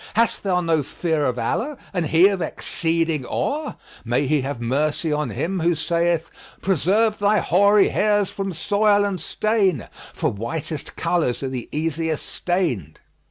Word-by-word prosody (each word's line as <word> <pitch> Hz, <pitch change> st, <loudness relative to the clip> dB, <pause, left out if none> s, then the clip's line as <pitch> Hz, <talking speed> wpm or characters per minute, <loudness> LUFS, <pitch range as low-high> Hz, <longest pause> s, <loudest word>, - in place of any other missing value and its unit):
Hast 230 Hz, +1 st, +2 dB
thou 180 Hz, -3 st, +1 dB
no 165 Hz, -3 st, +2 dB
fear 155 Hz, +2 st, -1 dB
of 125 Hz, -2 st, 0 dB
Allah, 250 Hz, -, -1 dB, 0.2 s
and 175 Hz, -4 st, 0 dB
He 165 Hz, +5 st, +6 dB
of 195 Hz, -3 st, -2 dB
exceeding 165 Hz, -3 st, -1 dB
awe?[FN#45] 295 Hz, -, -2 dB, 0.3 s
May 120 Hz, +4 st, +1 dB
He 150 Hz, +1 st, +2 dB
have 135 Hz, -1 st, -4 dB
mercy 145 Hz, +6 st, 0 dB
on 150 Hz, -3 st, -1 dB
him 180 Hz, -, -2 dB
who 170 Hz, +1 st, +2 dB
saith, 170 Hz, +1 st, 0 dB, 0.3 s
'Preserve 200 Hz, +5 st, +2 dB
thy 205 Hz, +1 st, +3 dB
hoary 200 Hz, +2 st, +4 dB
hairs 205 Hz, -2 st, +1 dB
from 195 Hz, -1 st, -3 dB
soil 205 Hz, +3 st, +2 dB
and 190 Hz, -4 st, -2 dB
stain, 200 Hz, -, 0 dB
* -, -, -16 dB
For -, -, 0 dB
whitest 140 Hz, +8 st, -5 dB
colours 165 Hz, -7 st, 0 dB
are 135 Hz, -, -1 dB
the 125 Hz, -3 st, -5 dB
easiest 160 Hz, 0 st, -2 dB
stained!'" 145 Hz, -, -2 dB
170 Hz, 160 wpm, -22 LUFS, 145-195 Hz, 0.3 s, He